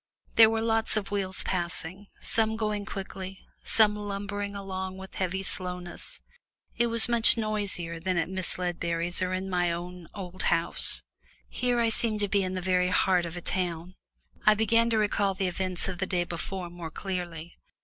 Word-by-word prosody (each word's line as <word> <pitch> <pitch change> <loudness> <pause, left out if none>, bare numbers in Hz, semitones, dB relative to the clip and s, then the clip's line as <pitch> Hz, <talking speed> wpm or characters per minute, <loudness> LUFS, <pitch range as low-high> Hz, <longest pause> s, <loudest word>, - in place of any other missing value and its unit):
There 225 -1 +8
were 225 0 0
lots 225 -1 +1
of 200 -2 -3
wheels 195 -2 0
passing, 180 +2 -3
some 220 -1 +1
going 210 -2 -1
quickly, 190 -1 -7 0.2
some 210 -2 +4
lumbering 205 0 -4
along 190 -1 -5
with 190 0 -10
heavy 190 +1 -2
slowness 180 -2 -4 0.5
it 235 0 +2
was 230 0 +6
much 235 -1 +6
noisier 200 -6 -2
than 185 +1 -1
at 165 -1 +1
Miss 185 0 -3
Ledbury's 175 0 -1
or 185 0 0
at 185 0 -1
my 180 -2 0
own 175 0 -6
old 185 -2 -7
home. 165 - +1 0.7
Here 245 -1 0
I 230 -1 +3
seemed 220 -1 +2
to 205 - +2
be 200 0 +2
in 185 0 -2
the 185 - -2
very 180 0 +2
heart 180 -1 +3
of 170 +1 -6
a - - -5
town. 175 -1 -2 0.5
I 215 - +6
began 230 +2 +3
to 225 - +2
recall 205 -2 +1
the 190 - -1
events 185 0 0
of 185 -2 -4
the 190 - -1
day 180 -1 +1
before 175 +1 -5
more 175 -2 -7
clearly. 175 -2 -5
190 Hz, 180 wpm, -28 LUFS, 180-210 Hz, 0.7 s, There